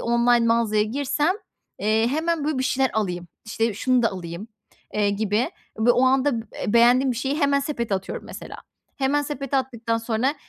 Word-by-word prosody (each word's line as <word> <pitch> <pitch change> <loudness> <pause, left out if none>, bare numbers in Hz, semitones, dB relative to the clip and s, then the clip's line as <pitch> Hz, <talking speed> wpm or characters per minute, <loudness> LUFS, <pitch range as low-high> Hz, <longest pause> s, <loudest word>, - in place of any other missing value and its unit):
online 235 0 +3
mağazaya 230 -2 +2
girsem, 285 - 0 0.4
eee, 220 +2 +2
hemen, 320 +2 -1
böyle, 300 -3 -1
bir 260 - 0
şeyler 265 -1 +1
alayım. 180 -5 -2 0.2
İşte, 225 0 -1
şunu 255 +3 +2
da 230 - +2
alayım, 175 +3 -7 0.5
eee, 205 -1 +2
gibi 210 +3 0 0.3
b 230 +2 +4
o 250 - +3
anda 260 -2 +2
b - - -21
eee, 205 - -2
beğendiğim 245 +3 +5
bir - - -6
şeyi 270 +4 -1
hemen 280 0 +3
sepete 235 -7 -2
atıyorum, 190 0 -5
mesela. - - -9 0.4
Hemen 280 +2 +1
sepete 275 -2 -3
attıktan 235 -3 -1
sonra, 230 +5 0
235 Hz, 175 wpm, -23 LUFS, 220-270 Hz, 0.5 s, beğendiğim